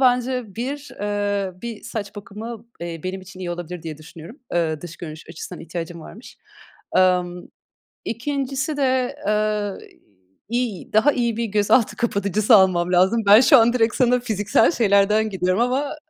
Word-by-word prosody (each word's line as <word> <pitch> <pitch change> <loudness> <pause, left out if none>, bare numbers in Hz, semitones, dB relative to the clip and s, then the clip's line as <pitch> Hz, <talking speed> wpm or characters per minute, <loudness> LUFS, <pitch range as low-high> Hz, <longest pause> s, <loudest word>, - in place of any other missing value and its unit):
bence 250 -4 +1
bir, 280 +4 -4
ııı, 205 -2 -2
bir 230 -3 -6
saç 220 -3 -6
bakımı, 215 +3 -8
eee, 170 -1 -5
benim 190 +1 -4
için 185 0 -13
iyi 175 - -4
olabilir 175 0 -6
diye 155 -2 -7
düşünüyorum. 165 - -12 0.2
Iıı, 160 -3 0
dış 170 -1 -9
görünüş 155 -1 -9
açısından 165 - -8
ihtiyacım 170 0 -6
varmış. 215 +9 -12 0.6
Imm 180 -1 +2 0.6
2'ncisi 275 +4 -2
de, 260 -1 +1
ııı, 210 -1 0 0.7
iy 235 -7 -3
daha 220 +7 +5
iyi 235 -4 -1
bir 235 - -1
gözaltı 210 +2 +2
kapatıcısı 210 0 +2
almam 180 -3 +3
lazım. 190 +6 +3
Ben 210 +3 +9
şu 275 +1 +7
an 235 +1 +4
direkt 225 -2 +2
sana 250 -1 +3
fiziksel 215 - +2
şeylerden 210 -2 +3
gidiyorum 185 +1 0
ama 270 +5 0
210 Hz, 150 wpm, -22 LUFS, 185-240 Hz, 0.7 s, Ben